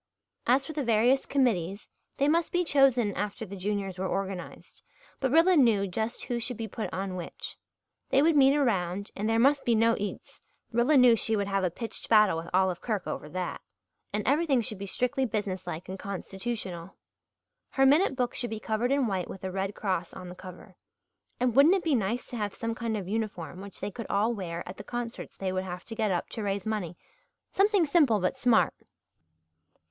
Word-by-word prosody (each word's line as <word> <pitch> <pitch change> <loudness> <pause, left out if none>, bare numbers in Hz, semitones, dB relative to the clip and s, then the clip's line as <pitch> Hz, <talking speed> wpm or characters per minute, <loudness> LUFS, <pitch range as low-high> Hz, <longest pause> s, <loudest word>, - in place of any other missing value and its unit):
As 260 +3 +3
for 315 - -6
the 295 -1 -2
various 235 +3 +3
committees, 205 -8 0 0.3
they 280 - +2
must 330 +2 +2
be 355 0 +2
chosen 265 - +3
after 210 +3 -4
the 200 0 -8
Juniors 195 -1 -3
were 190 - -1
organized, 195 -1 -5 0.4
but 265 - +1
Rilla 330 +6 +5
knew 230 -9 +4
just 220 +6 -3
who 240 -1 -2
should 235 0 -4
be 225 -1 -4
put 220 +1 -5
on 190 0 -3
which. 175 -2 -7 0.5
They 275 - +4
would 325 0 +4
meet 275 0 +6
around 200 -8 0
and 210 +2 -2
there 225 - +2
must 275 +4 +4
be 235 - +2
no 230 +1 +4
eats 205 0 -6 0.3
Rilla 245 +6 +3
knew 250 -2 +7
she 220 0 +1
would 200 -1 0
have 195 -1 0
a 180 - +2
pitched 225 +7 -5
battle 215 -5 +5
with 165 +1 -6
Olive 185 -1 +1
Kirk 215 -6 -2
over 150 - -5
that 180 +2 -4 0.5
and 210 0 -2
everything 285 -3 +3
should 215 -3 -3
be 200 - -5
strictly 250 +6 0
business 200 -5 -3
like 170 0 -5
and 190 +1 -6
constitutional. 195 -2 -5 0.7
Her 270 - +3
minute 290 +3 +4
book 250 -2 -1
should 240 - -1
be 220 0 -4
covered 220 +4 -1
in 275 -1 +2
white 190 -5 -2
with 190 - -9
a 190 - -3
Red 195 +1 -3
Cross 185 -4 -2
on 180 - -8
the 180 - -9
cover 185 0 -12 0.6
and 245 -2 +1
wouldn't 295 +7 +7
it 380 - -1
be 320 - +1
nice 230 +1 0
to 245 - -4
have 205 -2 -3
some 230 0 -3
kind 230 -1 -2
of 190 -3 -5
uniform 195 -5 -4
which 200 0 -10
they 200 +2 -3
could 225 +2 -7
all 215 +4 +2
wear 175 -5 -5
at 185 - -8
the 200 - -8
concerts 240 +1 -6
they 190 -1 -2
would 185 0 -1
have 180 -1 -7
to 225 - -7
get 220 -2 0
up 175 - -1
to 225 - -5
raise 200 -2 -2
money 195 -6 -3 0.5
something 400 -2 +3
simple 285 -9 +4
but 185 +5 0
smart? 245 -3 +3
215 Hz, 205 wpm, -28 LUFS, 190-250 Hz, 0.7 s, knew